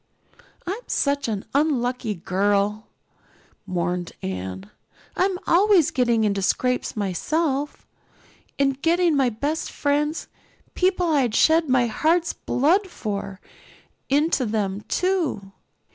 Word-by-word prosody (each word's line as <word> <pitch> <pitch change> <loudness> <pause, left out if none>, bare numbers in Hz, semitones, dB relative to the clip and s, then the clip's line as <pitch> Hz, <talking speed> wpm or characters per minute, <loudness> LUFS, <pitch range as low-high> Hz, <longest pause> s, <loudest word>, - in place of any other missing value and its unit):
"I'm 385 +5 -3
such 280 -1 0
an 210 -3 -3
unlucky 250 -6 0
girl," 200 +4 0 0.8
mourned 175 -1 -2
Anne. 95 +1 -5 0.4
"I'm 375 0 +1
always 375 -2 +4
getting 240 -3 +2
into 200 -2 0
scrapes 250 +5 0
myself 280 - -1 0.7
and 275 -1 +1
getting 340 0 +3
my 270 -3 +3
best 285 +8 -3
friends 295 +2 -1 0.5
people 370 -1 +1
I'd 255 -7 +2
shed 320 -1 +4
my 255 -1 +3
heart's 325 +9 +1
blood 350 +10 +1
for 200 - -5 0.7
into 290 0 +2
them 205 -2 -2
too. 335 - -1
265 Hz, 105 wpm, -23 LUFS, 205-320 Hz, 0.8 s, always